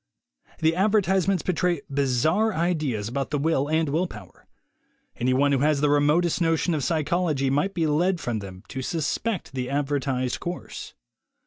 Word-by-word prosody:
The 160 +1 +3
advertisements 195 -2 +2
betray 175 -3 0
bizarre 140 - +1
ideas 150 - -1
about 135 +4 -3
the 150 - -1
will 145 -1 +1
and 160 0 +1
will 165 +6 0
power. 105 - -13 0.7
Any 125 +2 0
one 140 +2 +3
who 135 - +2
has 150 +1 +2
the 145 0 +2
remotest 150 +5 +2
notion 165 +1 +1
of 150 -3 -1
psychology 155 -2 0
might 170 +8 0
be 165 -2 +1
led 170 +4 +1
from 120 -7 -2
them 95 -2 -9
to 130 - -4
suspect 170 - -2
the 130 -1 -3
advertised 135 -3 -1
course. 175 0 -6
150 Hz, 155 wpm, -25 LUFS, 135-175 Hz, 0.7 s, The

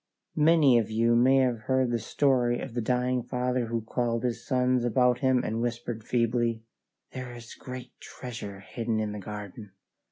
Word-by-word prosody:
Many 150 -5 +5
of 110 -1 -2
you 115 +2 +2
may 130 +3 +5
have 125 -3 +1
heard 130 -2 +2
the 120 - 0
story 125 +1 +1
of 135 - -6
the 120 - -1
dying 125 +2 0
father 125 0 -1
who 115 0 -2
called 115 +1 -1
his 120 -2 -2
sons 125 -2 +1
about 125 0 +3
him 130 -1 +2
and 110 +1 -2
whispered 120 -1 -3
feebly, 115 -1 0 0.5
"There 130 -2 -7
is 115 -1 -10
great 130 -1 -8
treasure 105 -6 -8
hidden 115 +2 -3
in 105 -1 -2
the 105 - -6
garden." 105 0 -8
120 Hz, 170 wpm, -28 LUFS, 115-125 Hz, 0.5 s, Many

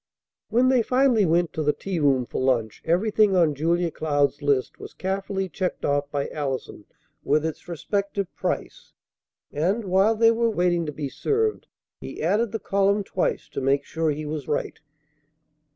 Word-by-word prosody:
When 245 +4 +3
they 260 -2 +4
finally 250 -4 +3
went 170 +1 +1
to 160 - -2
the 150 -1 +2
tea 190 -3 -4
room 135 -4 +2
for - - -4
lunch, 120 -4 0
everything 205 +3 +3
on 165 -4 +4
Julia 170 +4 0
Cloud's 145 -2 0
list 140 -3 0
was - - -10
carefully 195 0 -2
checked 185 0 -3
off 145 0 0
by 145 -1 -2
Allison 135 -7 -4 0.4
with 155 +1 +2
its 160 +1 -5
respective 200 +3 -3
price; - - -4 0.6
and, 190 +9 0
while 195 +4 +3
they 225 +1 +5
were 230 0 +1
waiting 175 -5 +1
to - - -2
be 145 -1 -4
served, 430 - -1 0.3
he - - -8
added 205 +6 +1
the 225 - -2
column 200 0 +1
twice 185 - -2
to - - -4
make 135 +1 +2
sure 160 0 -1
he 150 +1 -3
was 150 -2 -5
right. 145 - -2
175 Hz, 170 wpm, -24 LUFS, 145-200 Hz, 0.6 s, they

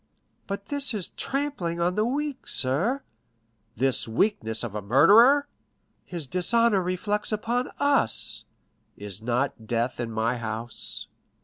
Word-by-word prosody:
"But 200 0 -5
this 280 -4 +1
is 195 -5 -2
trampling 275 -12 -3
on 175 +1 +1
the 210 - +1
weak, 280 +3 -3
sir." 175 - 0 0.7
"The 130 +1 +1
weakness 110 - 0
of 115 -4 -5
a 105 - -3
murderer!" 210 - +6 0.6
"His 170 -4 -5
dishonor 200 - +3
reflects 205 +4 -1
upon 235 +4 -1
us." 285 - +1 0.5
"Is 100 0 -6
not 120 -1 -2
death 120 +3 -1
in 120 -1 -2
my 115 +3 0
house?" 115 0 -3
180 Hz, 125 wpm, -26 LUFS, -, 0.7 s, murderer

